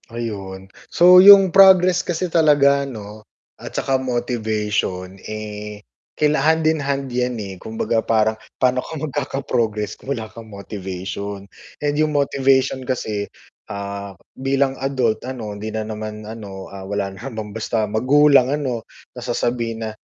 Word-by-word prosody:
Ayun, 100 -5 -6 0.2
so 180 +1 +7
yung 195 -2 +9
progress 185 -2 +6
kasi 175 +1 -2
talaga 140 -4 +4
'no 105 -3 -9 0.4
at - - -8
saka 135 -1 0
motivation, 105 -6 -2
eh, 105 -1 -7 0.3
kaila 150 -2 +2
hand-and-hand 155 -3 +1
'yan 125 0 -1
eh. 100 -3 -6
Kumbaga 110 +1 -1
parang, 110 -1 +2 0.2
paano 125 0 +2
ka 160 - -8
magkaka-progress 125 -7 -2
kung - - -11
wala 110 - -5
kang 115 -1 -11
motivation. 100 0 -6 0.3
And 145 0 -1
yung 150 -1 +1
motivation 135 -1 +2
kasi, 110 -5 -3 0.4
ah, 100 -1 -6 0.2
bilang 135 0 0
adult 130 -5 0
ano, 115 -5 -6
hindi 105 +2 -6
na 110 0 -3
naman 110 0 -6
ano, 105 -3 -8
ah, 100 - -8
wala 100 -1 -2
namang 110 -1 -7
basta 110 0 -1
magulang 130 +5 +4
ano, 135 -5 -2 0.3
na 125 - -9
sasabihin 120 -2 -2
na, - - -3
115 Hz, 135 wpm, -20 LUFS, 105-140 Hz, 0.4 s, yung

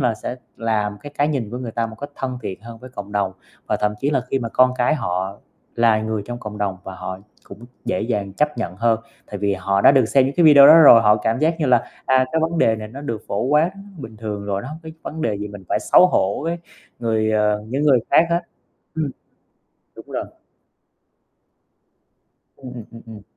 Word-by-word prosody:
là 125 -4 +1
sẽ 120 +3 -6 0.2
làm 105 -2 -1
cái 145 - -9
cái 145 - +2
nhìn 130 -8 -2
của 120 - -5
người 125 -2 -5
ta 115 0 -1
một 110 0 -11
cách 145 0 -6
thân 130 -1 -4
thiện 95 -3 -6
hơn 115 0 -10
với 125 +2 -12
cộng 100 -3 -8
đồng, 100 -2 0 0.3
và - - 0
thậm 105 0 0
chí 140 - 0
là 140 - +1
khi 135 - +1
mà 115 -3 -4
con 130 +2 +4
cái 125 +5 +2
họ 95 -6 -3 0.4
là 115 -2 +3
người 110 -1 -2
trong 120 +3 -6
cộng 105 -2 -8
đồng 100 -2 -2
và 95 - -7
họ 95 0 -6 0.3
cũng 115 - -12 0.2
dễ 90 - -1
dàng 105 -4 -2
chấp 150 +8 -1
nhận 90 +2 -4
hơn. 115 +1 +2 0.3
Tại 105 - -7
vì 100 0 0
họ 100 +1 0
đã 135 - +7
được 135 -3 +4
xem 130 +4 +3
những 140 - -3
cái 175 - +3
video 145 -2 +9
đó 155 - +9
rồi, 130 -7 +8
họ 105 -1 +5
cảm 110 +2 -1
giác 160 +3 +2
như 150 - +1
là, 125 -2 +5 0.3
à, 130 0 +4
cái 160 - +1
vấn 165 +1 -1
đề 110 -1 +3
này 110 0 -7
nó 130 +6 -9
được 115 -7 -5
phổ 100 - -1
quát 150 +6 +2 0.3
bình 115 -6 -9
thường 105 -2 -5
rồi, 100 -1 -2
nó 125 - -7
hông 155 +2 -8
có 160 - -9 0.2
vấn 160 +1 -6
đề 110 - 0
gì 105 0 -5
mình 100 -2 -11
phải - - +1
xấu 180 - +6
hổ 100 - 0
với 170 +1 -2 0.4
người, 110 -2 0
ờ 105 -1 +1
những 135 +5 -2
người 140 -4 +5
khác 165 - +5
hết. 170 +1 +2 0.5
Ừm. 155 -3 -2 0.9
Đúng - - -12
rồi. - - -3 2.3
Ừm, 130 -2 -10
ừm, 120 -3 -8
ừm, 115 -1 -12
ừm. 110 -2 -11
115 Hz, 235 wpm, -21 LUFS, 105-140 Hz, 2.3 s, video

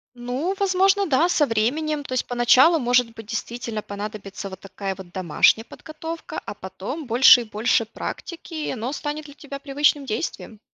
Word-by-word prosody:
Ну 255 +10 -3
возможно 390 +1 +3
да, 320 +2 +3
со 300 -4 +3
временем. 290 +7 0
То 260 -2 -5
есть 255 - 0
поначалу 250 +7 +5
может 245 -2 +2
быть 225 -1 -10
действительно 230 0 -4
понадобится 200 -1 -7
вот 190 - -9
такая 195 0 -5
вот 185 -2 -11
домашняя 185 +4 +3
подготовка, 320 +4 -7
а - - -5
потом 200 - -7
больше 245 +1 +7
и - - -7
больше 220 +1 +1
практики, 330 +9 -7
и 310 -1 -3
оно 245 0 -3
станет 295 +1 -4
для 285 - -13
тебя 280 -1 -9
привычным 285 0 +1
действием. 220 -1 -4
250 Hz, 170 wpm, -23 LUFS, 215-305 Hz, -, больше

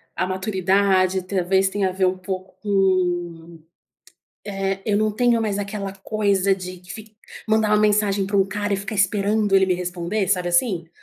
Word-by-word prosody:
a 185 - 0
maturidade, 190 -1 +1
talvez 190 0 +1
tenha 195 -1 0
a - - -4
ver 185 0 +1
pouco 185 0 -6
com, 175 -4 -1 0.9
eh, 195 -1 -3
eu 205 -2 +1
não 215 0 +1
tenho 240 +1 +2
mais 210 -2 -1
aquela 200 -1 -4
coisa 195 -1 0
de 185 -1 -8
fic 215 0 -11 0.3
mandar 220 -1 +2
uma 210 - +4
mensagem 205 -2 +2
pra 200 +1 -1
um 195 - +4
cara 205 +1 -3
e - - +2
ficar 200 +3 -5
esperando 205 +1 +1
ele 190 0 +5
me 185 - +1
responder, 180 +2 -3
sabe 180 -3 +1
assim? 175 -2 +1
195 Hz, 170 wpm, -22 LUFS, 185-205 Hz, 0.9 s, ele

